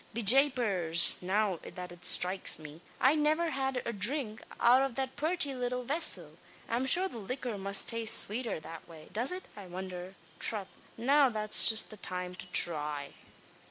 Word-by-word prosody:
Be 235 - -4
japers! 205 - +4
now 190 -1 -2
that 180 -1 -10
it 175 0 -15
stroikes 185 +1 +2
me, 155 +1 -13 0.2
I 265 +3 +3
niver 310 +2 0
had 265 -1 -3
a 235 - -4
dhrink 220 +2 -4 0.2
out 250 +3 +4
av 270 -3 -3
that 265 0 -5
purty 315 -1 +1
little 250 0 -4
vessel. 300 +7 -1 0.3
I'm 245 +3 -3
shure 365 +8 +3
the 240 -11 -10
liquor 245 +2 -6
must 200 0 0
taste 230 -1 +1
swater 225 -2 -5
that 165 +1 -12
way. 160 -2 -15
Does 235 - +1
it, 365 +1 -6
I 200 -3 -11
wondher 185 +1 -9 0.2
trath, 205 -4 0 0.3
now's 240 -4 +4
just 220 0 +2
the 215 - -11
time 180 -1 -6
to 180 - -11
thry." 150 -5 +1
220 Hz, 165 wpm, -29 LUFS, 180-265 Hz, 0.3 s, japers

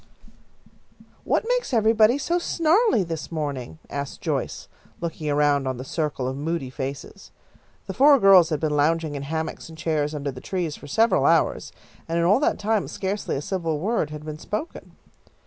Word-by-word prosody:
"What 455 - 0
makes - - 0
everybody 220 +2 +4
so 335 +5 0
snarly 340 - +2
this 165 -2 -6
morning?" 140 - -4
asked 140 -1 -5
Joyce, - - -3 0.3
looking 160 -2 -4
around 145 -2 +2
on 130 -1 -2
the 130 - -6
circle 140 -2 -2
of 130 - -3
moody 145 -2 -3
faces. 135 0 -7 0.6
The - - -5
four 280 +1 +6
girls 195 -5 +7
had 155 - -1
been 150 -1 0
lounging 155 +1 +1
in 140 - -4
hammocks 160 +3 -4
and 160 - -12
chairs 155 -2 -1
under 140 -1 -3
the 125 -1 -10
trees 175 -6 -3
for 145 - -12
several 225 +11 +3
hours, - - +2 0.4
and 165 +1 -1
in 170 - +2
all 200 +7 +4
that 295 - +1
time 215 0 0
scarcely 195 +2 -3
a 140 - -3
civil 165 -4 -2
word 200 -3 0
had 150 0 -8
been 155 0 -6
spoken. 215 - -6
160 Hz, 175 wpm, -24 LUFS, 145-210 Hz, 0.6 s, girls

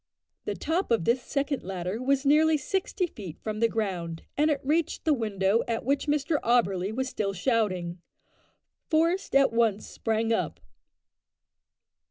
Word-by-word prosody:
The - - -2
top 340 +5 -1
of 230 -8 +2
this 245 +2 +2
second 280 +2 -2
ladder 185 +3 -4
was 275 +2 +1
nearly 310 +2 +5
sixty 375 +5 -1
feet 195 - -9
from 215 -1 -3
the 230 - +4
ground, 180 -7 -3
and 300 +2 +3
it 290 -2 +1
reached 310 +4 0
the 315 - +4
window 210 -3 +1
at 225 -1 -2
which 280 +3 0
Mr 295 +1 +1
Auberly 200 -5 +2
was 260 +4 -2
still 210 -6 -2
shouting. 185 -5 -1 0.9
Forest 335 +2 +1
at 275 -3 +5
once 225 -3 +2
sprang 225 0 -1
up. - - -2
235 Hz, 150 wpm, -27 LUFS, 200-290 Hz, 0.9 s, nearly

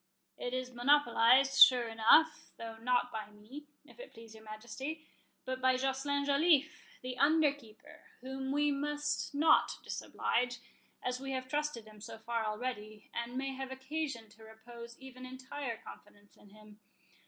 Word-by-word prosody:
"It 245 +1 -4
is 255 0 -4
monopolized, 265 0 +4
sure 250 -2 +8
enough, 230 +8 +4
though 225 -1 -7
not 245 +2 0
by 215 -1 -6
me, 220 +8 -12 0.2
if - - -18
it - - -11
please 225 -1 -13
your 220 0 -14
Majesty, 240 +9 -7 0.4
but 260 0 -4
by 260 0 +4
Joceline 270 +2 -1
Joliffe, 295 +1 +3 0.3
the 255 0 -5
under 300 0 +4
keeper, 225 -7 -16 0.2
whom 265 +1 -5
we 290 +1 +2
must 295 +1 -2
not 310 +2 +4
disoblige, 245 +1 -1 0.5
as 250 0 -2
we 270 0 -5
have 255 0 -4
trusted 295 -4 -2
him 215 -1 -15
so 225 +1 -8
far 225 0 -2
already, 215 -1 -5
and 235 +1 -4
may 270 0 -2
have 265 0 -6
occasion 265 -3 -4
to 220 +1 -18
repose 235 +2 -12
even 260 -1 -12
entire 260 -1 -6
confidence 205 -2 -15
in 205 - -19
him. 210 0 -17
255 Hz, 155 wpm, -33 LUFS, 225-280 Hz, 0.5 s, sure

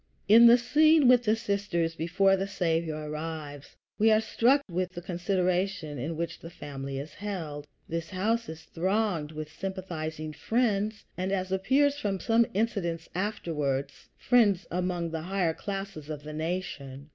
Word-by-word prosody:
In 230 +3 +9
the 235 +1 +8
scene 305 +4 +5
with 245 -1 +6
the 215 0 +4
sisters 200 -6 -1
before 180 +4 +2
the 195 +1 -2
Saviour 165 -5 -1
arrives, 150 -2 -6 0.2
we 220 +2 +5
are 215 0 +5
struck 245 +5 +3
with 180 0 -2
the 175 - -6
consideration 180 -3 -1
in 155 +6 -3
which 165 0 -3
the 165 - -9
family 135 -4 -6
is 145 +3 -6
held. 160 -8 -5 0.2
This 165 0 -4
house 225 +5 -1
is 160 0 -8
thronged 180 -3 -1
with 155 0 -7
sympathizing 160 -5 -5
friends, 215 0 0
and, 185 +1 -2
as 185 -1 -1
appears 275 +9 +2
from 195 -5 -1
some 230 +2 +3
incidents 195 -7 -1
afterwards, 160 -8 -2
friends 205 -7 +3
among 175 -1 -1
the 160 -1 -3
higher 180 -1 0
classes 195 -6 -6
of 150 -2 -5
the 155 0 -7
nation. 155 -4 -4
180 Hz, 155 wpm, -28 LUFS, 160-205 Hz, 0.2 s, In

